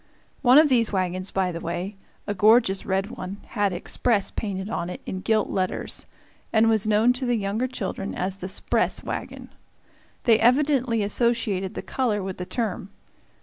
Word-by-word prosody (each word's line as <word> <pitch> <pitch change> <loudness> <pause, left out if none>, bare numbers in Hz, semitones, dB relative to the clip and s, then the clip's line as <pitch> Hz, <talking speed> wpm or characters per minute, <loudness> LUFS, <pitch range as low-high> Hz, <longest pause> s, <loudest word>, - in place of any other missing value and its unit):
One 255 0 +6
of 310 0 +8
these 235 -5 +2
wagons, 185 -1 -1
by 190 -2 0
the 170 - -5
way, 180 +4 -4 0.3
a 205 - -2
gorgeous 210 -1 +4
red 195 +3 0
one, 190 -3 -6
had 205 -2 0
"Express" 200 +4 0
painted 195 -3 -4
on 180 -5 -3
it - - -6
in 185 - -4
gilt 215 +2 +1
letters, 185 -1 -2 0.4
and 225 0 +4
was 220 -1 +2
known 215 +3 +4
to 255 +1 -4
the 245 - +2
younger 210 +5 -1
children 195 -5 -4
as 185 +1 -2
the 185 -1 -6
"'spress" - - 0
wagon. - - -6 0.7
They 225 -3 +5
evidently 250 -2 +3
associated 210 -3 0
the - - -5
color 220 -7 -1
with 190 -1 -5
the 180 - -5
term. 210 -5 -3
205 Hz, 170 wpm, -25 LUFS, 190-235 Hz, 0.7 s, of